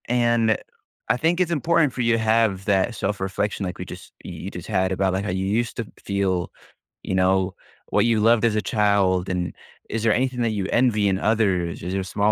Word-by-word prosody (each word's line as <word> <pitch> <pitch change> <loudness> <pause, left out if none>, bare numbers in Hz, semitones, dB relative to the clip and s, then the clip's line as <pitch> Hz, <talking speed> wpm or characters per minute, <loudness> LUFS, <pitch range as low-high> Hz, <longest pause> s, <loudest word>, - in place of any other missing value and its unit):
And 120 -2 +2 0.5
I - - +3
think 165 +5 +1
it's 180 -2 +1
important 160 -2 +2
for 125 - -3
you 115 -1 +2
have 110 -3 +1
that 100 +3 +1
self-reflection, 100 0 -2
like 90 0 -5
we 90 - -5
just - - -11
y - - -6
you 95 - -7
just 90 - -8
had 95 -3 0
about, 95 0 +1
like, 95 +2 -2
how 105 - -2
you 95 +1 -2
used 115 +4 -1
to 115 - -3 0.2
feel, 95 -3 -1 0.5
you 95 - -2
know, 95 0 +2 0.4
what - - +2
you 115 -2 +2
loved 115 +1 +4
as 110 -2 +2
a 110 - +1
child, 100 -4 +1
and 90 -1 -2 0.4
is 115 0 -3
there 115 -2 +4
anything 125 -1 0
that 115 - +1
you 100 -3 -2
envy 115 -4 +3
in 95 0 0
others? 95 -6 0
Is 90 - -3
there 95 0 -1
small 100 +3 +1
105 Hz, 215 wpm, -23 LUFS, 95-115 Hz, 0.5 s, loved